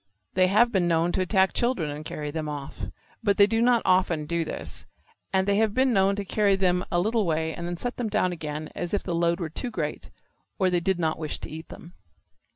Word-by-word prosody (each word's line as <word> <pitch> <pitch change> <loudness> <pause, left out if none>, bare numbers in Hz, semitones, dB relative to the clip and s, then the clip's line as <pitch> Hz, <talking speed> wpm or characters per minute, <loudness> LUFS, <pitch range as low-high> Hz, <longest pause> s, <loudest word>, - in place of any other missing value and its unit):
They 185 0 +4
have 225 +5 +4
been 185 -5 +2
known 165 +1 +2
to 185 - 0
attack 190 0 +3
children 235 - 0
and 150 +1 -6
carry 150 -1 -5
them 155 0 -3
off. 145 -2 -6 0.3
But 200 -1 +2
they 200 - +8
do 225 +2 +1
not 240 -1 +4
often 180 -4 +2
do 170 +2 0
this, - - -5 0.4
and 190 -1 +2
they 200 0 +3
have 220 -1 +2
been 260 -1 +3
known 195 -1 +3
to 200 0 -4
carry 200 0 +2
them 180 -1 +2
a 175 - +2
little 220 +4 +1
way 160 -2 0
and 170 - -5
then 175 0 -4
set 245 +7 -4
them 240 -3 -2
down 185 -3 +1
again 155 -2 -5
as 175 +3 -2
if - - -2
the 175 - -3
load 170 +1 +1
were 170 - -2
too 250 +9 -3
great 230 - -4 0.5
or 185 -3 +2
they 175 - +3
did 190 +2 0
not 160 -2 -1
wish 155 -2 -3
to - - -6
eat 160 +1 -8
them. 170 - -11
180 Hz, 240 wpm, -26 LUFS, 165-205 Hz, 0.5 s, they